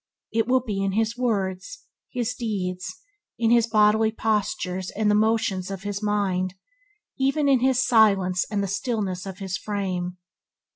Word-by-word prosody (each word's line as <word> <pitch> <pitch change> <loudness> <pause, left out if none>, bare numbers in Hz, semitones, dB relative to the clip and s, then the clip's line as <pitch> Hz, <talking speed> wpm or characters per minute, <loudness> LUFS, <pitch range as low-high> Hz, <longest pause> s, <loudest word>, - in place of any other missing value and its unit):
It 225 0 +1
will 255 0 +3
be 205 -5 -3
in 195 -1 0
his 225 +2 0
words, 210 - -2 0.3
his 245 -1 -1
deeds, 190 -6 -3 0.5
in 230 0 +2
his 235 -1 +4
bodily 220 0 +4
postures 205 -4 -1
and 210 0 +1
the - - +3
motions 210 -4 +1
of 195 -1 -6
his 205 0 -3
mind, 195 -3 0 0.6
even 275 +2 +2
in 270 -2 +5
his 255 0 +2
silence 195 -6 +4
and 205 -2 -1
the - - -1
stillness 195 -3 -2
of 190 -1 -7
his 190 -2 -3
frame. 185 -3 -3
210 Hz, 155 wpm, -24 LUFS, 190-230 Hz, 0.6 s, in